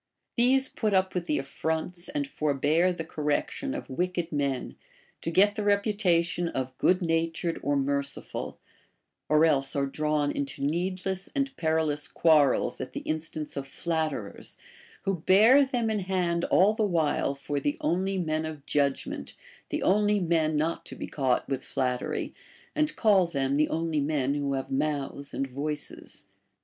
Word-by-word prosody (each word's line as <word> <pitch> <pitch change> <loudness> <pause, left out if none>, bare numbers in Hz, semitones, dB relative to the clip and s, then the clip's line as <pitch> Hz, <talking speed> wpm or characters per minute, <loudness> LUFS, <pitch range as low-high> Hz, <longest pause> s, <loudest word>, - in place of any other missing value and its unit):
These 265 +2 +4
put 215 -5 -1
up 185 0 +2
with 180 -1 -2
the 150 - +1
afl'ronts 160 +5 -3
and 290 -1 0
forbear 155 - +2
the 175 -2 -4
correction 155 - -2
of - - -6
wicked 175 +4 -2
men, 140 -3 -1 0.5
to - - -2
get 200 +5 +4
the 215 - -3
reputation 200 -4 +2
of 130 -4 -3
good 180 +1 +3
natured 165 0 0
or 145 - +1
merciful; 140 0 -2 0.7
or 155 +1 +5
else 135 -3 +1
are 140 -1 +1
drawn 150 +1 0
into 140 0 -4
needless 185 +5 -1
and 275 -1 -1
perilous 160 - 0
quarrels 150 -5 +3
at 130 0 -6
the - - -4
instance 155 -1 -4
of 140 -1 -4
flatterers, 155 -9 -3 0.5
who 195 -3 -1
bear 220 - +6
them 240 -4 0
in 215 - 0
hand 180 -3 0
all 200 +4 +4
the 220 0 0
while 155 -5 +1
for 140 +1 -3
the 290 - -1
only 195 - 0
men 155 -3 -1
of 155 -3 -6
judgment, 140 -2 -1 0.3
the - - -2
only 205 +2 +3
men 165 -3 +1
not 160 +3 0
to - - -7
be - - -5
caught 130 -4 0
with 135 -1 -2
flattery, 125 -1 -2 0.4
and 305 0 +1
call 200 -5 +4
them 135 -4 -1
the 150 +1 +2
only 165 -1 0
men 140 -2 0
who 140 -1 -1
have 135 - -4
mouths 140 0 -2
and 135 - -1
voices. 145 +3 -5
160 Hz, 160 wpm, -28 LUFS, 145-185 Hz, 0.7 s, bear